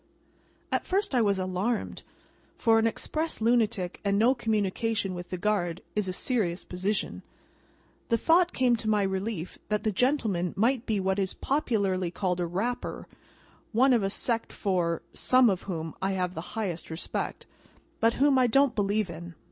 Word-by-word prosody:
At -, -, +1 dB
first 390 Hz, -3 st, 0 dB
I 250 Hz, -, +4 dB
was 200 Hz, -3 st, +2 dB
alarmed, 185 Hz, +5 st, -2 dB, 0.6 s
for 225 Hz, -1 st, +4 dB
an 225 Hz, -, +3 dB
Express 315 Hz, +8 st, -2 dB
lunatic 220 Hz, -5 st, +1 dB
and 200 Hz, -1 st, +1 dB
no 235 Hz, +5 st, +5 dB
communication 220 Hz, -3 st, -1 dB
with 175 Hz, 0 st, -7 dB
the 185 Hz, -, -3 dB
guard, 175 Hz, -4 st, -1 dB
is 210 Hz, -2 st, 0 dB
a -, -, -1 dB
serious 185 Hz, -4 st, -1 dB
position. 190 Hz, +3 st, -2 dB, 0.9 s
The 230 Hz, -, +3 dB
thought 345 Hz, +8 st, +4 dB
came 250 Hz, -2 st, +3 dB
to 220 Hz, -1 st, -3 dB
my 210 Hz, -1 st, +3 dB
relief 190 Hz, -2 st, -3 dB
that 210 Hz, -1 st, 0 dB
the 215 Hz, -, +1 dB
gentleman 210 Hz, -6 st, 0 dB
might 240 Hz, +4 st, +1 dB
be 215 Hz, -3 st, +1 dB
what 190 Hz, +1 st, 0 dB
is 190 Hz, -1 st, -1 dB
popularly 200 Hz, -, 0 dB
called 180 Hz, 0 st, -1 dB
a 175 Hz, -, 0 dB
Rapper: 215 Hz, +9 st, -3 dB, 0.7 s
one 255 Hz, +4 st, +5 dB
of 235 Hz, -, +3 dB
a 195 Hz, -, 0 dB
sect 230 Hz, +3 st, 0 dB
for 175 Hz, -4 st, -1 dB
(some 255 Hz, -3 st, +4 dB
of) 190 Hz, -, -2 dB
whom 160 Hz, -3 st, -3 dB
I 195 Hz, +1 st, 0 dB
have 180 Hz, -1 st, -1 dB
the 175 Hz, +6 st, -7 dB
highest 185 Hz, -7 st, -3 dB
respect, 160 Hz, +1 st, -4 dB, 0.5 s
but 230 Hz, 0 st, +3 dB
whom 275 Hz, -1 st, +4 dB
I 250 Hz, -, +4 dB
don't 275 Hz, +2 st, +4 dB
believe 205 Hz, 0 st, +1 dB
in. 170 Hz, 0 st, -9 dB
210 Hz, 170 wpm, -28 LUFS, 185-235 Hz, 0.9 s, no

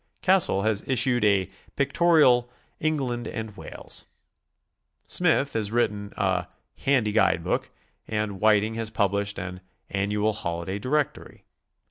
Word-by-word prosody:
Cassell 185 Hz, -, +4 dB
has 110 Hz, -2 st, 0 dB
issued 125 Hz, -2 st, +2 dB
a 100 Hz, -3 st, +3 dB, 0.3 s
"Pictorial 140 Hz, -4 st, +4 dB, 0.3 s
England 130 Hz, -7 st, -1 dB
and 110 Hz, -2 st, -6 dB
Wales," -, -, -6 dB, 1.0 s
Smith 160 Hz, -5 st, +2 dB
has 110 Hz, -2 st, -1 dB
written 105 Hz, -3 st, -1 dB
a 95 Hz, -3 st, 0 dB, 0.4 s
"Handy 125 Hz, -6 st, +2 dB
Guidebook," 95 Hz, -5 st, +1 dB, 0.4 s
and 105 Hz, -3 st, -2 dB
Whiting 110 Hz, 0 st, +3 dB
has 115 Hz, -1 st, -3 dB
published 100 Hz, -1 st, 0 dB
an 90 Hz, 0 st, -6 dB, 0.3 s
"'Annual 105 Hz, +2 st, 0 dB
Holiday 85 Hz, 0 st, -4 dB
Directory." 140 Hz, +6 st, -2 dB
110 Hz, 110 wpm, -25 LUFS, 100-125 Hz, 1.0 s, Cassell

